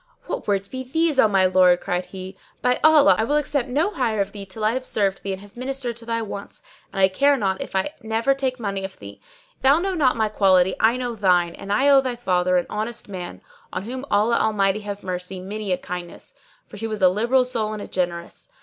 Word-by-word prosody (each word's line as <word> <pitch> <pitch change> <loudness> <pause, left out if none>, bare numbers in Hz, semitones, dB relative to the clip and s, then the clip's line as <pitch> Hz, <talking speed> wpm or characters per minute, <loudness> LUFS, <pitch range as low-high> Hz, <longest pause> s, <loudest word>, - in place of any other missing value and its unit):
"What - - -5
words 200 -1 0
be 260 +5 -6
these, 310 +2 0
O 225 - +7
my 195 -2 +3
lord?" 185 -1 +5
cried 180 -1 -2
he. 190 0 -9 0.3
"By 250 0 +2
Allah! 310 -2 +7
I - - +3
will 285 +6 0
accept 285 -3 -1
no 310 +10 +1
hire 235 - -1
of 200 0 0
thee 200 -1 -9
till 215 +3 -4
I 215 - +3
have 255 +2 -3
served 195 -5 -1
thee 195 - -4
and 190 0 -5
have 205 0 -16
ministered 255 -1 -4
to 230 0 -12
thy 230 -1 -1
wants; 200 - -8 0.3
and - - -5
I 190 - +6
care 280 +9 +3
not 190 -5 -1
if - - -7
I 190 +10 0
never 225 +4 +1
take 260 -2 -2
money 200 -3 -3
of 190 0 -7
thee. - - -12 0.4
If - - -41
thou 275 +3 +5
know 380 +3 -1
not 275 -8 +2
my 220 -1 +2
quality, 190 -3 +3
I 225 +3 +3
know 245 -1 -3
thine; 180 -5 +2
and 200 - -8
I 265 +7 +3
owe 275 -1 +7
thy 255 -2 -3
father, 180 -5 +1
an 175 - 0
honest 215 +1 -4
man, 180 -3 -7 0.3
on - - -4
whom 255 +4 -6
Allah 215 +3 +2
Almighty 205 -2 +1
have 205 -1 -7
mercy! 180 0 -5
many 200 +2 -5
a 180 - +2
kindness, 175 -1 -8 0.3
for - - -12
he 225 +2 -4
was 215 -3 -4
a - - +8
liberal 235 +7 +2
soul 230 -4 -2
and 215 -1 -5
a - - -8
generous. 175 - -4
215 Hz, 240 wpm, -23 LUFS, 190-255 Hz, 0.4 s, a